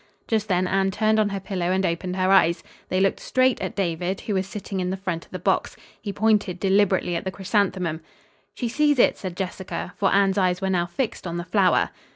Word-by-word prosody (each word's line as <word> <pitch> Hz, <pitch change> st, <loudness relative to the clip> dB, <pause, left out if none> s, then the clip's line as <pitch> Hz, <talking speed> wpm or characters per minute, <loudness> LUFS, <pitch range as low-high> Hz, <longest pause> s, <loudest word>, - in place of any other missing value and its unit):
Just 220 Hz, -2 st, 0 dB
then 185 Hz, -2 st, +1 dB
Anne 195 Hz, +1 st, +1 dB
turned 215 Hz, +2 st, +2 dB
on 210 Hz, -1 st, +2 dB
her 200 Hz, -1 st, -3 dB
pillow 185 Hz, -2 st, -2 dB
and 190 Hz, +1 st, +1 dB
opened 180 Hz, +1 st, -2 dB
her 185 Hz, 0 st, +1 dB
eyes. 170 Hz, -3 st, +4 dB, 0.3 s
They 185 Hz, -, +1 dB
looked 195 Hz, 0 st, +2 dB
straight 255 Hz, -1 st, +1 dB
at -, -, -4 dB
David, 180 Hz, 0 st, -2 dB
who 210 Hz, -, -3 dB
was 190 Hz, 0 st, 0 dB
sitting 195 Hz, -1 st, -5 dB
in 180 Hz, 0 st, -1 dB
the 190 Hz, -, -2 dB
front 185 Hz, -4 st, -4 dB
of -, -, -28 dB
the 185 Hz, -, -4 dB
box. 180 Hz, -, 0 dB, 0.2 s
He 205 Hz, -, -4 dB
pointed 205 Hz, -4 st, +1 dB
deliberately 190 Hz, -2 st, +2 dB
at 170 Hz, -, -2 dB
the 190 Hz, -, -2 dB
chrysanthemum. 185 Hz, -4 st, -1 dB, 0.5 s
"She 245 Hz, -, -2 dB
sees 295 Hz, +4 st, +2 dB
it," -, -, +3 dB
said 185 Hz, -2 st, -6 dB
Jessica, 185 Hz, -1 st, -5 dB
for 195 Hz, -, +2 dB
Anne's 195 Hz, 0 st, +3 dB
eyes 180 Hz, -1 st, +1 dB
were 190 Hz, -1 st, -1 dB
now 175 Hz, -2 st, +1 dB
fixed 200 Hz, +1 st, -3 dB
on 170 Hz, 0 st, -4 dB
the 175 Hz, -, -3 dB
flower. 185 Hz, 0 st, +2 dB
190 Hz, 220 wpm, -24 LUFS, 180-205 Hz, 0.5 s, eyes